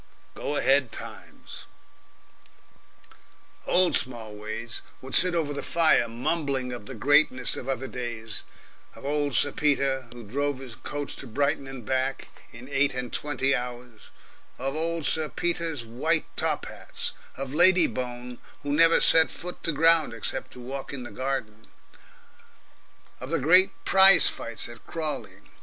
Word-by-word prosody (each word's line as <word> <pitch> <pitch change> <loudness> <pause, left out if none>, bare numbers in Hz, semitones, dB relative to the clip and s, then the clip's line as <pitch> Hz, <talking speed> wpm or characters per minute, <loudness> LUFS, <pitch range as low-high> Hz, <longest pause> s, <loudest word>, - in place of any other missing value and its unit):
Go 145 - -4
ahead 135 -3 +2
Times! - - -10 2.0
Old 180 -1 +4
Smallways 110 -1 -4 0.2
would 130 0 -10
sit 180 -1 +4
over 155 -3 -1
the 140 - -4
fire 165 -7 +3
mumbling 130 +1 -2
of 120 -4 -8
the 135 - -6
greatness 130 +1 +3
of 130 - -6
other 135 0 -2
days, 115 -5 -5 0.5
of - - -12
old 145 -2 -1
Sir 145 - +3
Peter, 135 -4 0
who 120 -1 -10
drove 140 +6 -2
his 130 -3 -9
coach 145 -1 -6
to - - -8
Brighton 140 +4 -1
and 135 -4 -9
back 130 +2 -2 0.2
in 120 +2 -11
eight 140 -1 +1
and 125 -1 -5
twenty 135 -2 -1
hours, 125 -2 -6 0.5
of 135 +2 -3
old 165 0 -1
Sir 155 +2 0
Peter's 165 -7 -2
white 150 +8 -1
top - - 0
hats, - - -3 0.2
of 135 0 -5
Lady 175 +2 +6
Bone, 125 -2 -5 0.2
who 145 0 -2
never 165 +2 +5
set 160 0 +6
foot 180 +1 -8
to 165 - -1
ground 165 -3 +3
except 125 +3 -4
to - - -12
walk 135 +2 -6
in 135 -3 -6
the 120 - -9
garden, 120 -5 -4 1.5
of 130 - -7
the 165 - +1
great, 180 +7 +6 0.2
prize 195 -1 +8
fights 115 -1 -5
at 120 0 -13
Crawley. 155 -2 -4
135 Hz, 150 wpm, -26 LUFS, 125-155 Hz, 2.0 s, prize